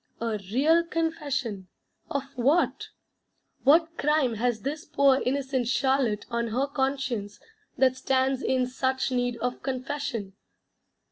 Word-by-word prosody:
A 225 Hz, -2 st, -2 dB
real 315 Hz, +8 st, +4 dB
Confession 290 Hz, -, -2 dB, 0.4 s
of 280 Hz, -2 st, -1 dB
what? 275 Hz, +8 st, +2 dB, 0.8 s
What 330 Hz, +4 st, +4 dB
crime 295 Hz, -4 st, +2 dB
has 225 Hz, 0 st, -1 dB
this 295 Hz, +3 st, -3 dB
poor 280 Hz, -3 st, +3 dB
innocent 265 Hz, -2 st, -1 dB
Charlotte 255 Hz, -4 st, +1 dB
on 235 Hz, 0 st, 0 dB
her 250 Hz, +5 st, 0 dB
conscience 265 Hz, -7 st, -2 dB, 0.4 s
that 260 Hz, -1 st, +4 dB
stands 260 Hz, 0 st, +1 dB
in 255 Hz, -1 st, +1 dB
such 260 Hz, +1 st, -1 dB
need 245 Hz, -1 st, 0 dB
of 245 Hz, 0 st, -3 dB
confession? 255 Hz, -6 st, -3 dB
260 Hz, 120 wpm, -27 LUFS, 245-280 Hz, 0.8 s, real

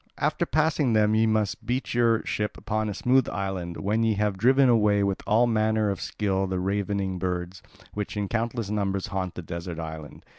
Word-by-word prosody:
After -, -, 0 dB
passing 150 Hz, -4 st, +2 dB
them 105 Hz, 0 st, +3 dB
ye 110 Hz, +1 st, +3 dB
must 110 Hz, 0 st, 0 dB
beach 125 Hz, +4 st, -2 dB
your 115 Hz, -2 st, +2 dB
ship 105 Hz, 0 st, -2 dB
upon 110 Hz, -1 st, -2 dB
a -, -, -3 dB
smooth 130 Hz, +3 st, +2 dB
island, 95 Hz, -3 st, -4 dB
when 105 Hz, +3 st, 0 dB
ye 110 Hz, -1 st, +2 dB
have 105 Hz, -1 st, 0 dB
driven 130 Hz, +7 st, +4 dB
away 105 Hz, -4 st, +3 dB
with 100 Hz, -1 st, -1 dB
all 115 Hz, +3 st, +4 dB
manner 110 Hz, -2 st, +1 dB
of 100 Hz, -, -5 dB
skill 95 Hz, -2 st, -1 dB
the 95 Hz, -1 st, -2 dB
ravening 100 Hz, 0 st, -1 dB
birds, 90 Hz, 0 st, -3 dB, 0.3 s
which 105 Hz, 0 st, -4 dB
in 100 Hz, -1 st, -1 dB
countless 115 Hz, -1 st, -2 dB
numbers 100 Hz, -2 st, -1 dB
haunt 95 Hz, -2 st, -2 dB
the 90 Hz, -, -6 dB
desert 85 Hz, +1 st, -6 dB
island. 80 Hz, -2 st, -8 dB
105 Hz, 190 wpm, -26 LUFS, 95-115 Hz, 0.3 s, driven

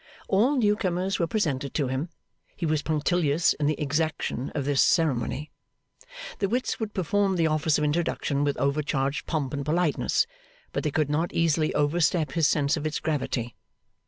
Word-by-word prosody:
All 230 Hz, +9 st, +3 dB
new 210 Hz, -4 st, +3 dB
comers 185 Hz, 0 st, -1 dB
were 170 Hz, -, +1 dB
presented 145 Hz, -, -1 dB
to 145 Hz, -4 st, +1 dB
him. 130 Hz, +6 st, -2 dB, 0.5 s
He 170 Hz, -, -3 dB
was 155 Hz, -1 st, +1 dB
punctilious 155 Hz, 0 st, +1 dB
in 145 Hz, -, -1 dB
the 155 Hz, -, 0 dB
exaction 150 Hz, -3 st, -1 dB
of 145 Hz, -3 st, -1 dB
this 140 Hz, -1 st, +3 dB
ceremony. 150 Hz, -3 st, +1 dB, 0.9 s
The 195 Hz, -, 0 dB
wits 250 Hz, +4 st, -1 dB
would 220 Hz, -2 st, -4 dB
perform 195 Hz, +1 st, +1 dB
the 165 Hz, -2 st, +2 dB
office 155 Hz, 0 st, +2 dB
of 150 Hz, -, -1 dB
introduction 150 Hz, -2 st, 0 dB
with 145 Hz, -1 st, 0 dB
overcharged 140 Hz, -1 st, -1 dB
pomp 145 Hz, -5 st, -2 dB
and 140 Hz, 0 st, -2 dB
politeness, 160 Hz, +1 st, +1 dB, 0.5 s
but -, -, -2 dB
they 155 Hz, -, +1 dB
could 150 Hz, 0 st, 0 dB
not 160 Hz, +4 st, 0 dB
easily 160 Hz, -2 st, +2 dB
overstep 150 Hz, 0 st, +2 dB
his 165 Hz, -1 st, +2 dB
sense 145 Hz, 0 st, +2 dB
of 155 Hz, -1 st, -2 dB
its 155 Hz, -, -2 dB
gravity. 130 Hz, -6 st, -2 dB
155 Hz, 170 wpm, -26 LUFS, 145-175 Hz, 0.9 s, All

